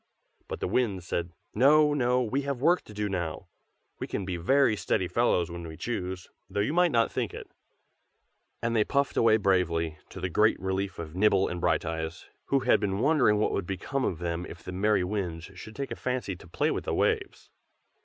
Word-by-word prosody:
But - - -6
the - - 0
Winds 100 -4 0
said 85 -1 -2 0.2
"No! 150 +5 +5
no! 125 -2 +2
we 130 +5 -1
have 140 -2 -3
work 170 +7 +3
to 105 - -12
do 105 0 -1
now. 90 -2 -4 0.5
We - - -4
can 100 - -3
be 90 -1 -3
very 115 +7 +3
steady 95 -2 0
fellows 90 -4 +1
when 85 -1 -6
we 80 -1 -9
choose, 95 -6 -4 0.2
though - - -3
you 105 +9 +1
might 175 0 +4
not 115 -2 +2
think - - -2
it." - - -9 1.1
And 115 0 0
they 110 - +4
puffed 140 +4 0
away 110 -1 +5
bravely, 85 -6 +1
to - - -9
the 90 - -1
great 105 +5 +3
relief 95 0 -2
of 80 -2 -7
Nibble 95 0 +3
and 90 0 -4
Brighteyes, 80 0 -1 0.2
who 135 -1 +1
had 130 - +4
been 100 -2 -1
wondering 125 -4 +3
what 105 - +1
would 95 - -2
become 115 +8 -2
of 85 - -1
them 85 0 -3
if 85 - -11
the - - -6
merry 100 +1 +2
Winds 90 -3 -3
should 110 +4 -10
take 140 -1 -4
a - - -2
fancy 125 -7 -3
to 85 - -15
play 85 - 0
with - - -3
the - - -1
waves. - - -1
100 Hz, 205 wpm, -28 LUFS, 90-120 Hz, 1.1 s, No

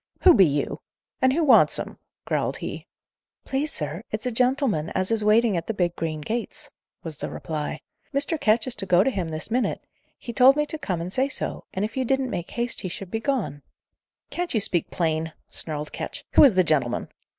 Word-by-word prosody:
"Who 365 - +8
be 190 - +6
you? 145 0 -2 0.4
and 260 - +5
who 325 +5 +1
wants 285 - +5
him?" - - -6 0.3
growled - - -1
he. - - -6 0.6
"Please, 280 +3 -1
sir, 150 +3 -2
it's 215 +2 -4
a 250 - 0
gentleman 245 - +1
as 185 +3 +1
is 225 -2 +2
waiting 215 0 +4
at 170 -1 -3
the 225 - -2
big 175 -3 0
green 155 -2 -3
gates," 240 - -4 0.3
was 160 -2 -7
the - - -4
reply. 155 -1 -4 0.3
"Mr. 290 +3 0
Ketch 220 +1 +3
is 255 - +1
to 195 -2 0
go 180 0 +5
to 270 - +1
him 185 -8 -3
this 155 +7 -4
minute; 250 +2 -1 0.3
he 235 - -7
told 260 +3 +7
me 300 0 +1
to 315 +1 -4
come 180 - -2
and 180 +3 -5
say 265 +2 +1
so, - - -3
and 190 +2 -1
if 215 - -7
you 260 - 0
didn't 265 0 0
make 175 0 -4
haste 235 0 -2
he 185 - -4
should 185 +1 -7
be 225 - -1
gone." 225 - -2 0.7
"Can't 350 -6 -3
you - - +4
speak 175 -4 0
plain?" 160 -1 -1 0.2
snarled 150 -2 -2
Ketch. - - -6
"Who - - +7
is 260 -9 +6
the 185 - +5
gentleman?" 140 -7 0
210 Hz, 215 wpm, -25 LUFS, 165-260 Hz, 0.7 s, Who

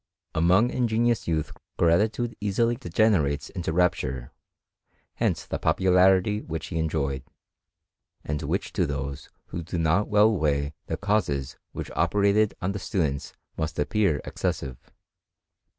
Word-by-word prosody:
Among 90 +9 +4
ingenuous 120 -2 +1
youth 80 -2 -1 0.3
gratitude 110 +8 +2
easily 115 +4 +1
degenerates 85 - +1
into 90 -4 -3
rapture; 70 -8 0 0.8
hence - - -1
the - - -4
popularity 95 +4 +3
which 80 0 -5
he 80 - -2
enjoyed, 70 -4 -1 1.0
and 75 0 -2
which - - -2
to - - +1
those 70 -1 -5 0.2
who 85 - -4
do 85 +1 -5
not 85 +5 +2
well 105 +1 +4
weigh 70 -4 0
the - - -2
causes 100 -11 0 0.2
which - - -6
operated 105 +1 +2
on 95 - +1
the 100 - -4
students 80 -7 -2 0.2
must 80 -1 -3
appear 80 0 +1
excessive. 65 -3 -4
90 Hz, 125 wpm, -26 LUFS, 75-105 Hz, 1.0 s, Among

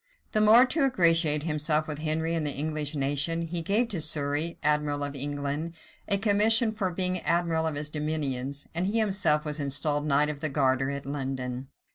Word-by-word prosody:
The 215 - +2
more 225 +4 +7
to 290 +3 0
ingratiate 165 - +3
himself 155 0 0
with 150 -1 -5
Henry 160 +1 -1
and 165 -2 -1
the 150 - -1
English 150 +1 -2
nation, 145 +4 -1
he 165 +1 -3
gave 210 +8 0
to 180 -8 -1
Surrey, 150 +2 0
admiral 150 -1 0
of 145 0 -3
England, 145 +3 -3 0.3
a 200 - +4
commission 220 +2 +3
for 205 -4 -2
being 185 +1 -1
admiral 165 -2 0
of 155 - -3
his 150 +1 -3
dominions; 145 -3 -3
and 175 +3 -1
he 210 +3 -1
himself 190 -8 +2
was 150 0 -3
installed 145 +1 0
knight 145 +1 +2
of 150 -2 -5
the 155 +1 -2
garter 135 -1 +1
at 140 0 -5
London. 130 -2 -4
155 Hz, 185 wpm, -27 LUFS, 145-170 Hz, 0.3 s, more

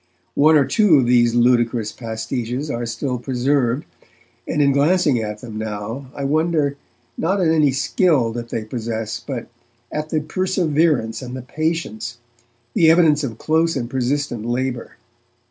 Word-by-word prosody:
One 155 +2 +5
or 145 -3 +5
two 190 - +4
of 130 - +3
these 120 -1 +3
ludicrous 120 -2 +2
pastiches 120 +4 -4
are 120 0 -3
still 125 +2 -3
preserved, 130 +1 0 0.6
and 150 - -1
in 140 -1 +4
glancing 145 -2 +3
at 105 -1 -5
them 110 -3 -7
now 110 +5 -5
I 140 - -4
wonder, 155 0 +1 0.4
not 190 +5 +1
at 175 -3 +2
any 155 -3 +4
skill 135 -2 +2
that 120 0 -6
they 115 - -3
possess, 110 0 -4
but 120 -1 -6 0.4
at 150 +1 -3
the 155 - +1
perseverance 155 - 0
and 125 0 -7
the 130 - -7
patience, 125 -6 -3 0.6
the 160 - +5
evidence 160 -3 +4
of 120 -5 -4
close 165 +1 +1
and 120 -3 -2
persistent 130 -2 -2
labour. 120 +1 -3
130 Hz, 150 wpm, -20 LUFS, 120-155 Hz, 0.6 s, One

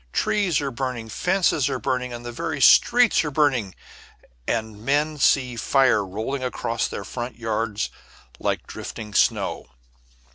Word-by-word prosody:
Trees 195 -8 +1
are 140 -1 -2
burning, 125 -3 -4
fences 175 - +1
are 135 - -1
burning, 125 +2 -2
the 120 - -6
very 145 +5 -4
streets 240 - +5
are 150 - -2
burning, 135 -9 +1 0.7
and 110 -2 -3
men 150 +3 0
see 130 -2 +3
fire 130 -3 +3
rolling 110 +8 -4
across 115 -2 -2
their - - -6
front 120 0 -5
yards 110 -2 -2 0.5
like - - -2
drifting 105 -1 -8
snow. - - +1
125 Hz, 135 wpm, -23 LUFS, 115-145 Hz, 0.7 s, streets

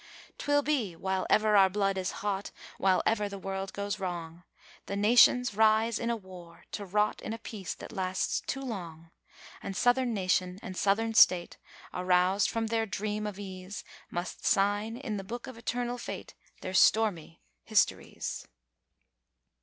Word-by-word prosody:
'Twill 290 0 +2
be 255 - 0
while 190 +2 -2
ever 215 -1 +4
our 195 -1 +7
blood 195 0 0
is 185 -1 -2 0.2
hot, 200 -1 -1 0.3
while 190 -1 +3
ever 210 -2 +1
the 200 - -6
world 195 0 -4
goes 205 +1 -3
wrong, 170 -3 -5 0.5
The 200 - -3
nations 240 +3 +5
rise 220 +2 +3
in 235 - -2
a 235 - +1
war, 180 -5 -12
to 205 - -5
rot 210 +3 +1
in 220 - -4
a - - -4
peace 215 -4 -6
that - - -10
lasts 185 -3 -1
too 270 - -2
long. 170 -10 -7 0.5
And 195 0 -5
southern 245 0 +3
nation 185 -3 0
and 185 - -6
southern 225 +4 +1
state, 180 -5 +5 0.3
aroused 180 +2 +2
from 225 0 -1
their 225 0 0
dream 210 +2 -3
of 205 -2 -6
ease, 190 -1 -7 0.3
Must 175 +1 -5
sign 205 +3 +1
in 235 -6 -4
the 195 - -5
Book 235 +5 -6
of 255 - -9
Eternal 245 +1 -3
Fate - - -7 0.3
their 185 - -5
stormy 190 -5 +3 0.2
histories. - - 0
200 Hz, 160 wpm, -30 LUFS, 185-225 Hz, 0.5 s, our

